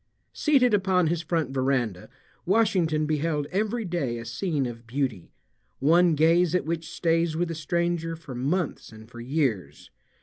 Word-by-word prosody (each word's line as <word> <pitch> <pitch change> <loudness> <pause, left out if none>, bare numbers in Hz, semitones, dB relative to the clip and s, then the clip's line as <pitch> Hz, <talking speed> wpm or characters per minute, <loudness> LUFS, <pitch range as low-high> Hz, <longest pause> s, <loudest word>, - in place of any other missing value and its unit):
Seated 265 -6 +3
upon 190 -3 +3
his 165 +1 0
front 160 -4 -1
veranda, 130 -8 -1 0.4
Washington 180 -7 +2
beheld 150 -1 -1
every 215 +4 -1
day 165 -10 -2
a 115 - -7
scene 155 -2 -2
of 115 -1 -7
beauty, 125 -7 -3 0.5
one 170 +3 +4
gaze 165 +3 +3
at 180 - 0
which 165 0 -3
stays 165 -1 0
with 175 0 -1
a - - -2
stranger 165 +1 -1
for 160 -5 -10
months 145 +8 -2
and 110 0 -13
for 120 0 -12
years. 120 - -2
160 Hz, 155 wpm, -26 LUFS, 135-175 Hz, 0.5 s, one